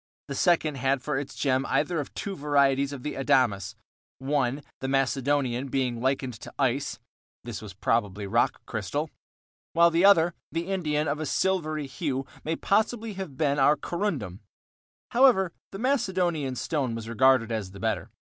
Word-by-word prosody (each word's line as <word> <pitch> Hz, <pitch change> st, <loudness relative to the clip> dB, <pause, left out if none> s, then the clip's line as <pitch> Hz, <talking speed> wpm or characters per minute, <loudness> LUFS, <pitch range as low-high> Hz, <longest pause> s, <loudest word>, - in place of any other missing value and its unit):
The -, -, -2 dB
second 155 Hz, -1 st, +2 dB
had 135 Hz, 0 st, 0 dB
for 150 Hz, +1 st, -2 dB
its 140 Hz, -, -7 dB
gem 130 Hz, -2 st, +1 dB
either 160 Hz, +3 st, +1 dB
of 145 Hz, -, -5 dB
two 200 Hz, -2 st, -4 dB
varieties 140 Hz, -2 st, +2 dB
of 135 Hz, -3 st, -7 dB
the 150 Hz, -, -3 dB
adamas,—one, 130 Hz, +4 st, -1 dB, 0.2 s
the 130 Hz, -, -3 dB
Macedonian, 135 Hz, -1 st, +1 dB
being 125 Hz, -3 st, -1 dB
likened 130 Hz, -1 st, 0 dB
to -, -, -9 dB
ice 135 Hz, 0 st, 0 dB, 0.5 s
(this 120 Hz, -4 st, -6 dB
was 105 Hz, -4 st, -9 dB
probably 105 Hz, -1 st, 0 dB
rock 100 Hz, -, +1 dB
crystal), -, -, -3 dB, 0.6 s
while 170 Hz, 0 st, +5 dB
the 165 Hz, +2 st, +2 dB
other, 175 Hz, -4 st, +6 dB, 0.2 s
the 165 Hz, +1 st, -2 dB
Indian, 155 Hz, -5 st, 0 dB
of 145 Hz, +2 st, -1 dB
a 155 Hz, -, -3 dB
silvery 155 Hz, -6 st, 0 dB
hue, 135 Hz, -1 st, -3 dB, 0.2 s
may 160 Hz, +1 st, -1 dB
possibly 220 Hz, +3 st, 0 dB
have 190 Hz, -9 st, -7 dB
been 145 Hz, -2 st, +1 dB
our 140 Hz, +3 st, +5 dB
corundum; 145 Hz, -, -3 dB, 0.7 s
however, 235 Hz, -9 st, +4 dB, 0.2 s
the 195 Hz, -, -6 dB
Macedonian 185 Hz, -, 0 dB
stone 130 Hz, -3 st, -1 dB
was 115 Hz, -1 st, -6 dB
regarded 120 Hz, 0 st, +3 dB
as 110 Hz, -4 st, -2 dB
the 100 Hz, +1 st, -12 dB
better. 110 Hz, +1 st, -1 dB
140 Hz, 155 wpm, -27 LUFS, 125-165 Hz, 0.7 s, other